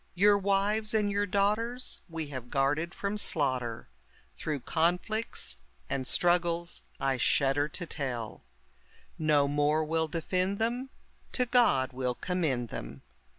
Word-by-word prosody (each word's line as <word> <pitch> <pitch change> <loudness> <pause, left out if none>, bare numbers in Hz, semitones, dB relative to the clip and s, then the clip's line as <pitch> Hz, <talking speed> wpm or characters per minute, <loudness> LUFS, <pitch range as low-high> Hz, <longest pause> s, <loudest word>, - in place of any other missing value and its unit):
Your 205 +3 +6
wives 200 +2 +1
and 210 -2 +2
your 205 +1 0
daughters 215 +6 0
we 165 -1 -4
have 130 -3 -7
guarded 145 +5 +1
from 205 +1 -2
slaughter, 130 - 0 0.5
Through 150 -4 -3
conflicts 180 - 0 0.3
and 130 -2 -1
struggles 175 -1 +1 0.2
I 135 -1 +1
shudder 140 +3 +2
to 175 +4 -6
tell; 125 -8 -4 0.8
No 150 -2 +3
more 145 +2 +2
well 160 +1 0
defend 185 +5 -1
them, 240 +4 -1 0.4
to 250 - +2
God 235 - +3
we'll 125 -1 -1
commend 150 - -1
them. 65 -3 -7
165 Hz, 125 wpm, -30 LUFS, 135-200 Hz, 0.8 s, Your